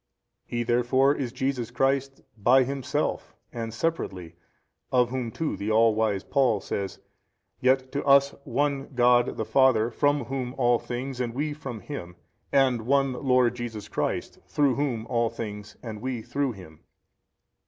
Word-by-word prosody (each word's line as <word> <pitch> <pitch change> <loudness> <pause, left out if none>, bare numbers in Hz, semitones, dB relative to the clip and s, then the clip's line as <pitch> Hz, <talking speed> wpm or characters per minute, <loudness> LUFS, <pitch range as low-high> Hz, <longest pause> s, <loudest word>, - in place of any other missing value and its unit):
A. - - -51
He 120 - +1
therefore 125 +3 +3
is 130 -5 -3
Jesus 130 -2 -2
Christ 135 +2 0
by 125 +5 +5
himself 140 +2 -2 0.2
and 115 -1 -4
separately, 100 - -3 0.6
of 125 -1 +3
Whom 125 -3 -2
too 155 +6 -3
the 100 +2 -4
all 110 +1 +4
wise 105 -3 0
Paul 130 -7 +2
says, 100 0 -4 0.6
Yet 130 0 +2
to 140 - -2
us 140 0 +5
One 140 -1 -1
God 120 0 +5
|282 - - -5
the 110 - -2
Father 125 -4 +3
from 145 +1 +1
Whom 130 0 -4
all 120 -2 +3
things 125 +1 -5
and 120 -1 -3
we 150 +2 -1
from 135 -7 -7
Him 90 -12 -7 0.4
and 130 -5 +2
One 135 -1 +3
Lord 125 -2 +2
Jesus 115 -4 -6
Christ - - -3
through 145 -3 +2
Whom 125 -5 -1
all 115 -1 +1
things 105 -2 -7
and 110 -3 -6
we 125 -3 -3
through 130 +2 -1
Him. 85 -6 -13
125 Hz, 160 wpm, -26 LUFS, 115-135 Hz, 0.6 s, by